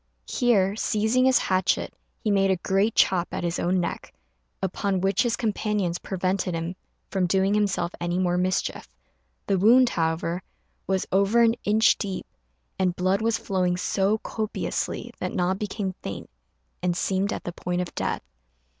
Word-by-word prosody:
Here, 200 Hz, -, +2 dB
seizing 220 Hz, +4 st, +1 dB
his 260 Hz, -1 st, +5 dB
hatchet, 185 Hz, 0 st, +1 dB, 0.3 s
he 215 Hz, -, +1 dB
made 195 Hz, -1 st, +3 dB
a 190 Hz, -, +4 dB
great 195 Hz, +4 st, +1 dB
chop 180 Hz, -2 st, +3 dB
at -, -, -3 dB
his 170 Hz, 0 st, -1 dB
own 180 Hz, +1 st, +1 dB
neck, 175 Hz, -, -4 dB, 0.5 s
upon 190 Hz, +1 st, -1 dB
which 195 Hz, +2 st, +2 dB
his 240 Hz, -2 st, +1 dB
companions 210 Hz, -6 st, -1 dB
prevented 185 Hz, -1 st, -1 dB
him 165 Hz, +2 st, -3 dB, 0.4 s
from 190 Hz, -2 st, +1 dB
doing 190 Hz, +2 st, +2 dB
himself 200 Hz, -4 st, +1 dB
any 175 Hz, +1 st, -1 dB
more 180 Hz, -1 st, +1 dB
mischief. 185 Hz, +1 st, -1 dB, 0.6 s
The 195 Hz, -, +1 dB
wound, 240 Hz, +5 st, +6 dB
however, 165 Hz, 0 st, -1 dB, 0.5 s
was 190 Hz, -1 st, 0 dB
over 200 Hz, +5 st, +4 dB
an 230 Hz, -1 st, +5 dB
inch 220 Hz, +2 st, +4 dB
deep, 195 Hz, -3 st, -4 dB, 0.5 s
and 180 Hz, -2 st, +1 dB
blood 185 Hz, +3 st, +1 dB
was 225 Hz, 0 st, +1 dB
flowing 180 Hz, -3 st, 0 dB
so 195 Hz, +3 st, +1 dB
copiously 215 Hz, 0 st, -3 dB
that -, -, -3 dB
Na 180 Hz, 0 st, +2 dB
became 200 Hz, -1 st, -3 dB
faint, 95 Hz, -10 st, -7 dB, 0.5 s
and 175 Hz, -1 st, 0 dB
seemed 195 Hz, +2 st, 0 dB
at -, -, -4 dB
the 175 Hz, -, -5 dB
point 180 Hz, +1 st, -2 dB
of 180 Hz, -, -5 dB
death. -, -, -2 dB
190 Hz, 160 wpm, -25 LUFS, 180-210 Hz, 0.6 s, wound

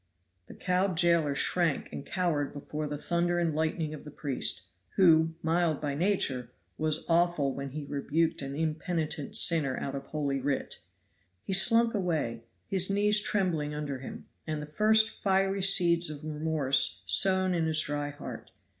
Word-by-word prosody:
The -, -, -12 dB
cowed 185 Hz, -1 st, 0 dB
jailer 170 Hz, -4 st, +2 dB
shrank 165 Hz, 0 st, 0 dB
and -, -, -6 dB
cowered 170 Hz, -6 st, -2 dB
before 150 Hz, +1 st, -5 dB
the 145 Hz, 0 st, -4 dB
thunder 175 Hz, +3 st, 0 dB
and 170 Hz, -2 st, 0 dB
lightning 155 Hz, 0 st, -2 dB
of 155 Hz, -, -9 dB
the 150 Hz, -, -10 dB
priest, 140 Hz, -8 st, -2 dB, 0.3 s
who, 165 Hz, -3 st, +4 dB
mild 165 Hz, -2 st, +1 dB
by 145 Hz, -2 st, -3 dB
nature, 140 Hz, -8 st, 0 dB, 0.3 s
was 155 Hz, 0 st, 0 dB
awful 170 Hz, -5 st, +1 dB
when 140 Hz, 0 st, -6 dB
he 145 Hz, +2 st, -7 dB
rebuked 145 Hz, +3 st, -1 dB
an 135 Hz, 0 st, -5 dB
impenitent 155 Hz, -1 st, -3 dB
sinner 150 Hz, -6 st, +1 dB
out 135 Hz, -, -4 dB
of 135 Hz, 0 st, -6 dB
holy 140 Hz, -3 st, -2 dB
writ. 135 Hz, +1 st, -3 dB, 0.6 s
He 195 Hz, -, -4 dB
slunk 230 Hz, +4 st, +4 dB
away, 155 Hz, -, -2 dB, 0.2 s
his 190 Hz, -1 st, +2 dB
knees 210 Hz, +1 st, +3 dB
trembling 165 Hz, -9 st, -1 dB
under 145 Hz, -3 st, -4 dB
him, 130 Hz, -, -9 dB, 0.2 s
and 155 Hz, -1 st, -3 dB
the 150 Hz, -, -6 dB
first 215 Hz, +8 st, +3 dB
fiery 195 Hz, -2 st, 0 dB
seeds 175 Hz, -3 st, +4 dB
of 150 Hz, 0 st, -8 dB
remorse 150 Hz, -, +2 dB
sown 185 Hz, -, +4 dB
in 165 Hz, -2 st, 0 dB
his 155 Hz, -1 st, +2 dB
dry 145 Hz, -1 st, -2 dB
heart. 145 Hz, -, -9 dB
160 Hz, 160 wpm, -29 LUFS, 145-180 Hz, 0.6 s, who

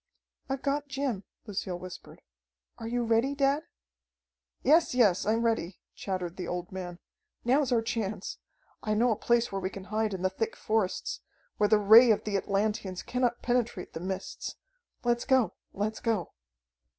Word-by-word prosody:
"I've 270 Hz, 0 st, -2 dB
got 285 Hz, +1 st, 0 dB
Jim," 270 Hz, -8 st, -2 dB, 0.2 s
Lucille 190 Hz, -4 st, -3 dB
whispered. 180 Hz, 0 st, -10 dB, 0.6 s
"Are 225 Hz, -, -5 dB
you 240 Hz, +1 st, 0 dB
ready, 230 Hz, +5 st, +2 dB
dad?" 280 Hz, +1 st, +2 dB, 1.0 s
"Yes, 310 Hz, 0 st, +4 dB
yes, 205 Hz, -7 st, +4 dB
I'm 225 Hz, +2 st, +2 dB
ready," 210 Hz, -6 st, 0 dB
chattered 185 Hz, -3 st, -4 dB
the 185 Hz, -, -4 dB
old 180 Hz, 0 st, -4 dB
man. 180 Hz, -2 st, -6 dB, 0.5 s
"Now's 265 Hz, +2 st, +3 dB
our 230 Hz, -2 st, +3 dB
chance. 215 Hz, -4 st, -3 dB, 0.4 s
I 215 Hz, -1 st, 0 dB
know 235 Hz, +3 st, +3 dB
a -, -, +2 dB
place 235 Hz, +2 st, +2 dB
where 195 Hz, 0 st, -2 dB
we 185 Hz, -, -1 dB
can 195 Hz, 0 st, -8 dB
hide 215 Hz, -2 st, +1 dB
in 185 Hz, -, -6 dB
the 185 Hz, -, +2 dB
thick 225 Hz, +4 st, -2 dB
forests, 215 Hz, -4 st, -1 dB, 0.4 s
where 210 Hz, -, +3 dB
the 215 Hz, -, +6 dB
Ray 220 Hz, +4 st, +8 dB
of 215 Hz, -, +3 dB
the 210 Hz, -2 st, -2 dB
Atlanteans 200 Hz, -1 st, -1 dB
cannot 245 Hz, -1 st, 0 dB
penetrate 240 Hz, -6 st, -1 dB
the -, -, -5 dB
mists. 190 Hz, +2 st, -5 dB, 0.5 s
Let's 240 Hz, -1 st, +1 dB
go! 260 Hz, -4 st, +3 dB, 0.2 s
Let's 215 Hz, +2 st, -2 dB
go!" 220 Hz, -7 st, -1 dB
220 Hz, 165 wpm, -29 LUFS, 190-240 Hz, 1.0 s, Ray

